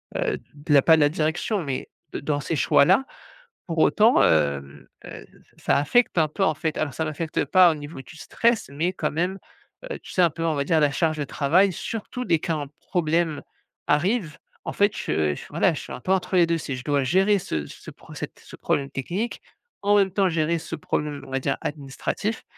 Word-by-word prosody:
heu, - - -1
de 145 0 -5
la 140 - +7
pas 160 +2 +6
de 155 - +2
la 145 - +5
direction, 160 +6 -1
mais 135 -2 -4 0.2
de - - -4
dans 145 0 -1
ces 160 - -3
choix-là. 190 - +4 0.6
Pour 165 -1 -4
autant, 220 +8 +5
hem, 70 -2 +1 0.2
heu, - - -9 0.3
ça - - +1
affecte 180 - +2
un 155 -1 +4
peu 195 +6 -2
en 155 - +3
fait. 155 0 -3
Alors 145 -4 -2
ça 160 - -2
m'affecte 155 -1 -2
pas 180 +3 +6
au - - -3
niveau 145 -1 -8
du 160 +4 -14
stress, 230 - 0
mais 160 +6 -1
quand 155 -4 -2
même, 180 +5 -2 0.5
heu, 480 - -5
tu - - -12
sais 185 - +1
un 170 - +5
peu 165 - -5
on 160 -2 +1
va 140 0 -1
dire 160 0 +2
la 145 -1 +3
charge 155 +2 0
de - - 0
travail, 170 +8 +2
surtout 230 +6 -5
dès 165 -7 +2
qu'un 155 -4 -2
problème 165 -3 0 0.5
arrive 170 +1 +1 0.3
en - - -4
fait, 205 0 +3
je 75 -2 0
je - - -9
voilà - - +2
je - - -5
suis - - -9
un - - -8
peu 190 - -2
entre 190 0 0
les 175 -2 +6
2 165 0 +1
c'est 140 -4 -4
je 125 - -8
dois 145 -2 +1
gérer 195 +7 +3
ce 75 - -4
ce - - -11
pro - - -15
cette - - -7
ce - - -13
problème 140 -1 -1
technique, 180 - -3 0.4
en 205 +1 +4
même 195 -2 +3
temps 195 0 +2
gérer 165 0 0
ce - - -6
problème 145 -2 -3
on - - -12
va 135 - 0
dire - - -1
administratif 150 +9 -4
160 Hz, 220 wpm, -24 LUFS, 145-185 Hz, 0.6 s, la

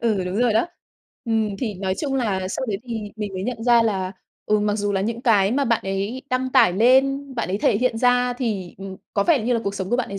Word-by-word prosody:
Ừ, 215 -6 0
đúng 180 +2 -3
rồi 240 -3 +3
đó. 225 +9 +2 0.6
Ừm, 220 -3 0
thì 220 -5 -3
nói 190 0 -2
chung 280 -3 -2
là 195 -7 -1
sau 260 - -3
đấy 195 -2 -1
thì 230 - -2 0.2
mình 205 -3 -5
mới 185 - -3
nhận 225 0 -4
ra 235 -1 +5
là, 190 -4 -1 0.3
ừ, 210 0 +3
mặc 210 0 +1
dù 205 -1 -1
là 195 - 0
những 230 +4 -3
cái 205 -6 +4
mà 280 +1 +1
bạn 230 -2 +1
ấy 195 +7 -3
đăng 255 0 0
tải 180 - +5
lên, 265 +6 +3
bạn 230 -6 -2
ấy 195 +2 -1
thể 205 - +2
hiện 245 -2 0
ra 245 0 +3
thì, 215 -8 -3
ừm, 195 -1 -8 0.2
có 200 - +3
vẻ 290 -9 +3
như 245 +2 0
là 230 - +1
cuộc 200 0 -2
sống 190 +1 -4
của 240 - +2
bạn 250 - -2
ấy 195 0 -5
220 Hz, 265 wpm, -22 LUFS, 195-245 Hz, 0.6 s, ra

